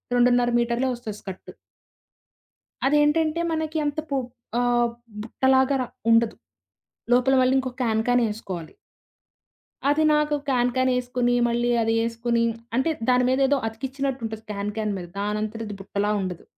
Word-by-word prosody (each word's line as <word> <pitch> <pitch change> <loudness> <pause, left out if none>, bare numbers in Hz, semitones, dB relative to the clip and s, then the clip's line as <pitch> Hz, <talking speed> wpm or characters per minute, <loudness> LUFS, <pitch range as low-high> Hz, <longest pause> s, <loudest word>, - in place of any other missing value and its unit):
2.5 245 0 +4
మీటర్లే 235 +2 0
వస్తది 225 -4 -7
స్కర్టు. 190 -2 -9 1.3
అదేంటంటే 300 +3 +3
మనకి 315 0 -2
అంత 290 +1 -1
పు 275 - 0 0.4
ఆహ్ 240 -1 +2 0.3
బుట్టలాగా‌రా 265 +2 +2 0.2
ఉండదు. 230 0 +4 0.8
లోపల 250 +2 +4
మళ్ళీ 255 +1 +3
ఇంకో 260 -1 -3
క్యాన్ 220 -1 +1
క్యాన్ 245 -1 +3
ఏసుకోవాలి 185 -6 -6 1.2
అది 310 +2 +3
నాకు 300 0 +2
క్యాన్ 245 -1 +2
క్యానేసుకొని 250 -1 +1
మళ్ళీ 240 +1 0
అది 225 0 +1
ఏసుకొని 230 0 0 0.3
అంటే 265 +6 +2 0.2
దాని 250 0 +4
మీద 260 +1 +2
ఏదో 285 0 +3
అతికించినట్టుంటది 255 -2 -4
క్యాన్ 205 0 -3
క్యాన్ 215 -2 -1
మీద. 175 -1 -7
దానంతటది 210 +1 -3
బుట్టలా 205 +2 -1
ఉండదు. 180 -3 -5
245 Hz, 125 wpm, -24 LUFS, 225-265 Hz, 1.3 s, 2.5